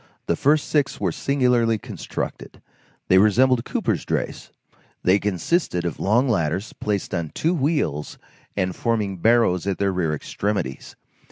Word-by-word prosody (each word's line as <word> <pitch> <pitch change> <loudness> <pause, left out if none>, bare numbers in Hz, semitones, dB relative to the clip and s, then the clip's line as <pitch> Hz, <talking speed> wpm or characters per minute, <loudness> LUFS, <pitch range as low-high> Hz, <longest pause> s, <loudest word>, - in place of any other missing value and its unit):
The 85 - +1
first 145 - +2
six 145 -3 0
were 95 -4 0
singularly 125 - +2
constructed. - - -6 0.5
They 95 - +6
resembled 120 +4 +4
coopers' - - -1
drays; - - -3 0.5
they 95 +3 +4
consisted 100 - 0
of 85 - -3
long 120 +7 +2
ladders 95 -2 -1
placed 105 -2 -3
on 85 -3 -2
two 165 +3 +1
wheels 145 - -1 0.4
and 95 -2 0
forming 105 -5 -1
barrows 105 -3 +3
at 100 - 0
their 100 -1 +1
rear 85 -4 0
extremities. 100 -4 -3
105 Hz, 140 wpm, -23 LUFS, 90-125 Hz, 0.5 s, They